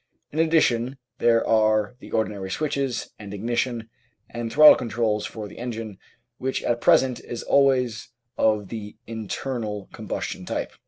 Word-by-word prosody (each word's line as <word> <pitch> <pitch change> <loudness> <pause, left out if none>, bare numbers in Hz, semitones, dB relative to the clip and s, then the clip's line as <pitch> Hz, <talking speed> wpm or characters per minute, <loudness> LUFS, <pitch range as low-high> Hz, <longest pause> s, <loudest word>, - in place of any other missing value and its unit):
In 155 - -3
addition 135 -6 +2 0.2
there 115 -1 +3
are 110 +1 +3
the - - -12
ordinary 100 -3 -2
switch, 150 +9 -1 0.4
and 105 -2 -8
ignition, 120 +2 -1 0.4
and 120 -1 -4
throttle 150 +6 +9
controls 115 -3 -1
for 110 -2 -7
the - - -12
engine, 115 -5 -5 0.4
which 130 0 -2
at 120 0 0
present 130 -2 +4
is 120 - -7
always 125 -4 +2 0.3
of 105 -3 +1
the 105 -2 -7
internal 110 -1 -4
com - - -9
bustion - - -4
type. - - -3
115 Hz, 145 wpm, -24 LUFS, 110-125 Hz, 0.4 s, throttle